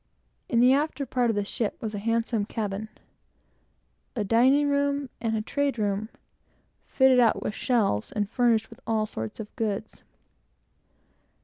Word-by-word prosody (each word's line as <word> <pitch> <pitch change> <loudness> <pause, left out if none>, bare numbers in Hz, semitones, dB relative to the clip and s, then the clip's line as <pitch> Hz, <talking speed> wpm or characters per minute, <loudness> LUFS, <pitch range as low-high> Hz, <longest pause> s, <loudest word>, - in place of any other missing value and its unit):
In 235 -2 +3
the 250 +2 +6
after 290 0 0
part 245 -1 0
of 225 - +1
the 205 -1 -1
ship 220 0 -3
was 220 -1 -4
a 205 - -3
handsome 230 0 0
cabin, 210 0 -4 1.3
a 220 - 0
dining 255 +8 +4
room, 280 -2 0
and 225 -1 0
a 215 - -2
trade 285 +1 -1
room, 205 0 -1 0.8
fitted 265 -1 +4
out 235 -2 +3
with - - -2
shelves 210 - 0
and 205 -1 -1
furnished 230 -1 +1
with - - -13
all 220 -1 +1
sorts 110 - -6
of 215 -1 -8
goods. 210 -3 -3
225 Hz, 150 wpm, -26 LUFS, 210-255 Hz, 1.3 s, the